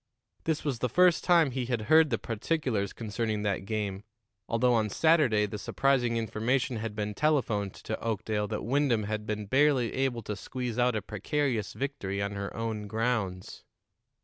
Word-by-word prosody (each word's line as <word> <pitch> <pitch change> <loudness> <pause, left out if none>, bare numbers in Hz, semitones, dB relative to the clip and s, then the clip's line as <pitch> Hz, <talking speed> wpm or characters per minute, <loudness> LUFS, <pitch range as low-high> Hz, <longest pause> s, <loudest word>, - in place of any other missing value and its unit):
This 160 -2 0
was 135 -6 -1
the 125 - 0
first 180 +1 +4
time 170 -6 +4
he 125 -1 -3
had 120 -3 -1
heard 155 +7 +5
the 115 - +1
particulars 115 - -1
concerning 110 -1 -3
that 100 -2 -1
game, 100 -2 -3 0.5
although 120 +2 +3
on 110 -2 +2
Saturday 140 -7 +3
the 105 0 -6
surprising 125 -1 +1
information 120 +3 0
had 110 -1 -4
been 105 0 -2
telephoned 115 -8 0
to 110 - -5
Oakdale 110 -1 -2
that 105 -1 -4
Wyndham 130 -3 +2
had 105 +1 -3
been 105 -1 -3
barely 130 +1 +3
able 130 -3 -1
to 105 - -4
squeeze 125 +4 -4
out 125 -1 +3
a 105 - -2
precarious 110 +2 -1
victory 130 -9 -3
on 100 0 -1
her 100 -1 -4
own 110 -2 -3
grounds. 110 -4 -2
115 Hz, 170 wpm, -29 LUFS, 105-130 Hz, 0.5 s, heard